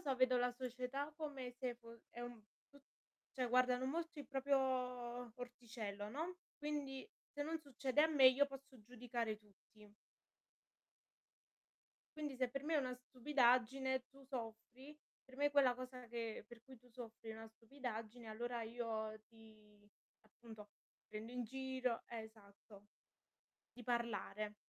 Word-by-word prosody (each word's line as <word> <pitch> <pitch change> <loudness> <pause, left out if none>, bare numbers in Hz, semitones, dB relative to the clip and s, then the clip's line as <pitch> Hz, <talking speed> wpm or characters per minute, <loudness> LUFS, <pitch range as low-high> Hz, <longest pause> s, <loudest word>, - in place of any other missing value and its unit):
so 280 -6 +1
vedo 255 0 +5
la 245 0 +3
società 255 +3 -2
come 280 -5 -3
se 250 -2 0
fo 230 -1 -12
è 240 - -7
un 240 -2 -5 0.9
cioè 255 -2 +1
guardano 255 +1 +5
molto 330 +2 -1
il 275 - -8
proprio 275 +1 +3 0.8
orticello, 230 -4 -5
no, 320 +9 -2 0.2
quindi 295 +2 -2 0.2
se 290 - -1
non 320 +2 -1
succede 275 -1 +1
a 315 - +8
me 285 -5 +8
io 275 +2 +5
posso 270 -2 -10
giudicare 235 -1 -2
tutti. 210 0 -19 2.2
Quindi 295 -3 -2
se 255 -1 +2
per 275 +2 -3
me 315 +2 +1
è - - +7
una 255 -3 +1
stupidaggine, 260 0 +4
tu 275 0 -15
soffri, 250 +3 -6 0.3
per 260 0 -14
me 290 +1 +4
quella 275 -4 +6
cosa 255 -1 -6
che 230 -1 -3
per 235 -1 -12
cui 260 +2 -12
tu 250 +1 -20
soffri 230 -2 -7
è - - -4
una 225 0 -7
stupidaggine 230 -2 -5
allora 235 +2 -2
io 220 -2 -2
ti, 215 -2 -17 0.3
appunto, 215 -1 -11 0.4
prendo 220 +3 -5
in 250 0 0
giro 260 0 -1
esatto 215 -2 -9 0.9
di 245 - -9
parlare. 225 -3 0
245 Hz, 140 wpm, -42 LUFS, 225-270 Hz, 2.2 s, a